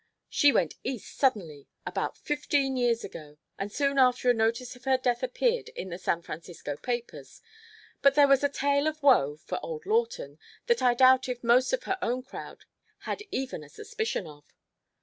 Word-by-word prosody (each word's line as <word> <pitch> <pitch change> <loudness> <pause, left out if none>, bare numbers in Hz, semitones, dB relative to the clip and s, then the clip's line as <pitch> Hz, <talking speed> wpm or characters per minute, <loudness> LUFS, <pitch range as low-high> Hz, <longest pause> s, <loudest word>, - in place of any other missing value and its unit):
She 290 - +5
went 175 - +1
East 250 -4 -5
suddenly 175 - 0 0.2
about - - -3
fifteen 290 -2 0
years 240 -2 +1
ago, 150 -5 -10 0.2
and 200 +1 -4
soon 280 +3 +1
after 250 -1 +4
a - - +3
notice 230 +2 -1
of 245 - -18
her 265 -1 +3
death 245 -2 0
appeared 470 - 0
in 190 - -5
the 175 +1 -6
San 170 -2 -1
Francisco 160 -3 -7
papers. 240 - -5 0.6
But 275 0 +5
there 290 -1 +6
was 275 0 +4
a 285 - +3
tale 280 +1 +1
of 310 -1 -3
woe 150 - +5
(for - - -5
old 465 -2 -6
Lawton) 465 +3 -1 0.3
that 475 -1 +2
I 245 -1 +4
doubt 260 +1 +5
if 245 -1 -4
most 240 +2 +4
of - - -1
her 380 0 -2
own 250 +2 -1
crowd - - -10 0.4
had - - -4
even 260 -11 -4
a 145 - -14
suspicion 445 - -4
of." 145 -2 -13
255 Hz, 185 wpm, -28 LUFS, 225-285 Hz, 0.6 s, there